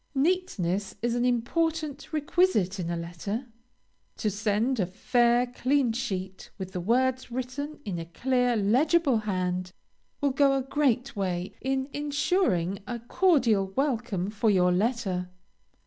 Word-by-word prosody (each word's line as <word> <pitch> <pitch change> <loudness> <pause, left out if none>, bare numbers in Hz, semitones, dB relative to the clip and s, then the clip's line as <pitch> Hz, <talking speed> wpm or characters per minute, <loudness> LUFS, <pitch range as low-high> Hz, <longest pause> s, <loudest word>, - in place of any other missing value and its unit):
Neatness 210 - 0
is 240 0 +1
an 240 +1 +1
important 295 +4 -1
requisite 295 - +1
in 170 -2 -3
a 170 - -1
letter. 175 +8 -4 0.7
To 215 - 0
send 215 +5 0
a 185 - +1
fair, 240 +5 +2
clean 255 0 +1
sheet, 190 -5 -4
with 190 -2 -6
the 180 - -4
words 255 +6 +1
written 260 +5 -5
in 185 -5 -3
a 165 - -5
clear, 250 +7 +1
legible 265 - +3
hand, 185 -3 -2 0.5
will 285 -1 +1
go 275 0 +3
a 265 - -1
great 270 -2 0
way 185 -2 -2
in 265 0 -1
ensuring 290 - 0
a 240 - -3
cordial 235 - +2
welcome 230 -9 -1
for 215 +1 +1
your 180 -3 +4
letter. 190 -3 0
235 Hz, 135 wpm, -27 LUFS, 190-275 Hz, 0.7 s, your